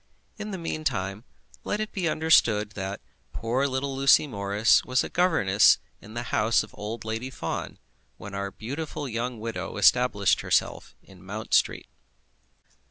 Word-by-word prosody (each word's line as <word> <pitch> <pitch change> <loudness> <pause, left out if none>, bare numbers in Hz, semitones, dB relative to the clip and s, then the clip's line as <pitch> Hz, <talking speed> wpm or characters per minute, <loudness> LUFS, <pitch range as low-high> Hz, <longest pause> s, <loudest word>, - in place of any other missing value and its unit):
In 210 0 -5
the 195 - -4
meantime, 120 - -3 0.4
let 210 - -2
it 215 0 -3
be 180 -4 -1
understood 120 -10 +3
that 100 -1 -5 0.3
poor 125 +5 0
little 135 0 -2
Lucy 135 +2 +5
Morris 100 -3 +2
was 130 0 +1
a - - -5
governess 160 - +4 0.2
in 110 +3 -12
the 120 - -3
house 110 +2 +3
of - - -14
old 110 +2 -6
Lady 115 +4 -3
Fawn, 80 -10 -5 0.4
when 100 - -9
our 100 0 -3
beautiful 145 +7 -5
young 120 0 -3
widow 115 +1 -5
established - - +3
herself - - -1
in 95 -2 -17
Mount 105 +3 -6
Street. - - +2
115 Hz, 150 wpm, -26 LUFS, 105-140 Hz, 0.4 s, Lucy